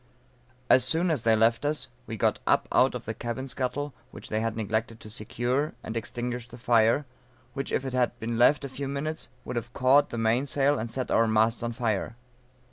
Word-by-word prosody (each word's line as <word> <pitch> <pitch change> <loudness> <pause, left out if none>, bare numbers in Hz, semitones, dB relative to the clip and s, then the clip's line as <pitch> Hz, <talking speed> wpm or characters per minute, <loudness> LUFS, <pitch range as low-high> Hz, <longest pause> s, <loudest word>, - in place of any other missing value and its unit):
As 130 - +6
soon 170 +2 +1
as 150 -7 0
they 115 0 +4
left 115 +3 +3
us, 150 +1 0 0.2
we 115 - -5
got - - +1
up - - +3
out - - +4
of - - -6
the - - -3
cabin 120 +3 -4
scuttle, 135 +2 -2 0.2
which - - -10
they 110 0 0
had 115 0 -2
neglected 110 +1 -2
to 110 - -11
secure, 125 +7 -2
and 110 - -6
extinguished 120 +1 -4
the 120 - -10
fire, 120 +3 +3 0.5
which 135 - -4
if 135 - 0
it 130 - -4
had 125 -2 0
been 115 +1 -3
left 140 +5 +4
a - - -3
few 135 +1 -5
minutes, 140 +1 -3 0.2
would 125 - -4
have 120 +1 -5
caught 135 +3 +4
the 120 - -5
mainsail 135 +5 +2
and 115 +1 -3
set 130 +1 -3
our 115 - +4
masts 110 +1 +2
on 120 0 -2
fire. 115 -2 -2
120 Hz, 210 wpm, -27 LUFS, 115-135 Hz, 0.5 s, As